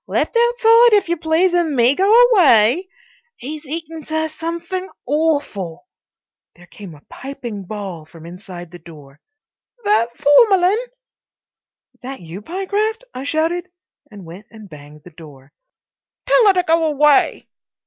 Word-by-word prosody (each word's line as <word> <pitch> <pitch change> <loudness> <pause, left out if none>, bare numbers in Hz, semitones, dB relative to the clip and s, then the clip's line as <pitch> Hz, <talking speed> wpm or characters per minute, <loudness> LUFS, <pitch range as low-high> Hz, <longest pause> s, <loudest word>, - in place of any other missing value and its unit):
Left - - -2
outside, 470 0 +4
if 405 -5 +2
you 345 - +1
please, 330 +3 +1
and 340 -4 0
me 245 +1 +3
go 385 +7 +1 0.2
away. 305 - +4 0.5
'E's 295 +4 -8
eatin', 320 +1 -7
sir, 315 +1 -3
somethink 340 +4 -5 0.2
AWFUL." 285 - -2 0.7
There 175 - -18
came 185 -2 -12
a 145 - -18
piping 240 -7 -8
bawl 190 -5 -7
from 165 0 -15
inside 175 -1 -11
the 175 - -12
door: 150 -4 -16 0.6
"That 410 - +2
Formalyn?" 375 - +4 1.2
"That 265 +1 -8
you, 175 +3 -10
Pyecraft?" 405 - -3
I 260 - -7
shouted, 330 +4 -2 0.4
and 200 -4 -13
went 180 +5 -12
and 215 -2 -14
banged 150 -2 -15
the 180 - -14
door. 145 -4 -16 0.7
"Tell - - +4
her 400 - +6
to 365 -1 0
go 330 0 +1
away." 295 -1 +2
290 Hz, 140 wpm, -18 LUFS, -, 1.2 s, her